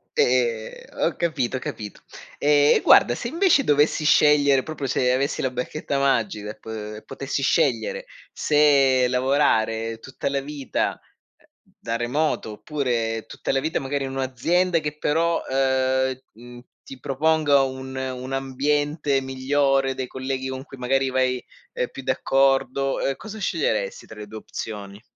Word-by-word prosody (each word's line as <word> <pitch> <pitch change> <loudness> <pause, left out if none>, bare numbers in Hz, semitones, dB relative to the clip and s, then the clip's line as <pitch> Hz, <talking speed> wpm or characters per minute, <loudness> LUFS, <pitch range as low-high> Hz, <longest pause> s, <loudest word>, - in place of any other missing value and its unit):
E, 120 -3 +1
ehm, - - -13
ho - - 0
capito, 135 -7 -1
capito. 105 -5 -7 0.4
Ehm, 145 0 +4
e - - +2
guarda, 120 - +6
se - - -4
invece 330 +1 +3
dovessi 150 - +2
scegliere 145 -3 +5
proprio 155 -3 -5
se 125 -1 +1
avessi 135 +2 0
la 130 - -1
bacchetta 140 +3 -3
magica 110 -6 0
e - - -12
p 105 -1 -7
potessi - - -4
scegliere - - +1 0.3
se 140 -4 +4
lavorare 115 -4 +1
tutta 130 +2 -5
la 140 0 0
vita, 140 -1 -3 0.4
ehm, - - -28 0.3
da 115 0 -3
remoto, 125 0 -1
oppure 115 -4 -2
tutta - - -4
la 135 - +2
vita 155 +4 -1
magari 135 +1 -2
in 135 - -5
un'azienda 165 +7 +1
che 150 -1 -5
però, 165 +3 +1
ehm, 130 -1 +1
mhmm, 120 +2 -12 0.3
ti 135 - -10
proponga 145 0 +2
un 130 0 -5
un 130 0 -4
ambiente 140 +2 0
migliore, 135 +1 +1
dei 130 -1 -4
colleghi 130 +1 -4
con 130 0 -5
cui 135 - -13
magari 135 +1 +1
vai, 130 -1 0 0.3
ehm, 125 - -1
più 135 - -9
d'accordo, 135 +1 +1
ehm, 135 - 0
cosa 220 0 -9
sceglieresti - - -1
tra 105 - -12
le 105 - -8
2 110 +1 -9
opzioni? 100 -2 -7
135 Hz, 150 wpm, -23 LUFS, 125-145 Hz, 0.4 s, guarda